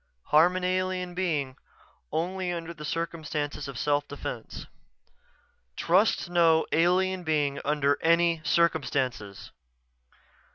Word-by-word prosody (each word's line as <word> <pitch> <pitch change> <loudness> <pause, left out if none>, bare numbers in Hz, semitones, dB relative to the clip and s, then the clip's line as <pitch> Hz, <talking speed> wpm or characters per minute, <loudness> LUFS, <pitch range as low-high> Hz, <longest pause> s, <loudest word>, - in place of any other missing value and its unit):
_ - - -25
Harm 165 +4 +5
an 185 - -3
alien 185 0 -1
being 155 -8 -2 0.6
only 180 +2 -2
under 170 -1 -5
circumstances 155 -3 -3
of 135 -3 -7
self 145 +1 0
defense. 145 - -7 1.1
_TRUST 185 +5 +2
NO 165 -2 +3
ALIEN 180 +3 +2
BEING 145 -3 0
UNDER 145 -1 +1
ANY 170 0 +3
CIRCUMSTANCES. 130 - -1
165 Hz, 100 wpm, -27 LUFS, 145-180 Hz, 1.1 s, Harm